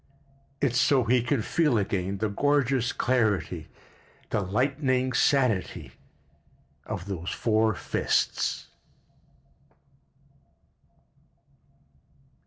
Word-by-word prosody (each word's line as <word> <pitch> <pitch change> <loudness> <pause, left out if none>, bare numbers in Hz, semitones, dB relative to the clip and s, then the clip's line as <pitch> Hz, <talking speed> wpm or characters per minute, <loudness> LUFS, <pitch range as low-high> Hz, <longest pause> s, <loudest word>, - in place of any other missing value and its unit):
It's 125 -3 +2
so 135 -3 +3
he 120 +2 +3
can 120 -1 0
feel 150 -4 +2
again 100 -1 -1
the 110 - -1
gorgeous 135 +2 +1
clarity, 100 -10 0 0.6
the 105 - +1
lightning 130 +5 0
sanity 125 -7 +1 1.0
of 90 - -5
those 90 -4 -5
four 110 -2 +1
fists. - - -1
115 Hz, 75 wpm, -27 LUFS, 100-130 Hz, 1.0 s, so